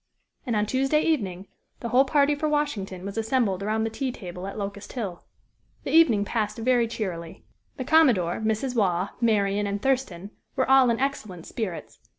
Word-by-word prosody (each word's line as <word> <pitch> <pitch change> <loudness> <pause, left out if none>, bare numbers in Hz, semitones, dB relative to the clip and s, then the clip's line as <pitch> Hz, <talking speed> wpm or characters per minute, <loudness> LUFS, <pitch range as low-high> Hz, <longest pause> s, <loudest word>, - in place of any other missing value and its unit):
And 235 - 0
on 210 0 +2
Tuesday 270 +6 +1
evening, 195 - -1 0.3
the 235 - -4
whole 255 +4 +4
party 285 +1 +3
for 305 +1 -1
Washington 205 -12 -2
was 200 +3 -4
assembled 220 -4 0
around 215 +2 0
the 225 - -2
tea 260 +3 -2
table 180 -4 -8
at 195 - -7
Locust 200 0 -6
Hill. 200 -9 -5 0.6
The - - -4
evening 240 -11 +5
passed 215 0 -2
very 240 0 +2
cheerily. 175 -7 -5 0.3
The 260 - -4
commodore, 245 - +4
Mrs. 220 +4 -1
Waugh, 190 -3 +1
Marian 205 -3 +2
and 200 0 -2
Thurston, 210 -7 -1 0.2
were 260 - +1
all 265 -1 +6
in 230 - +1
excellent 215 -11 -3
spirits. 205 -7 -5
220 Hz, 170 wpm, -25 LUFS, 195-265 Hz, 0.6 s, all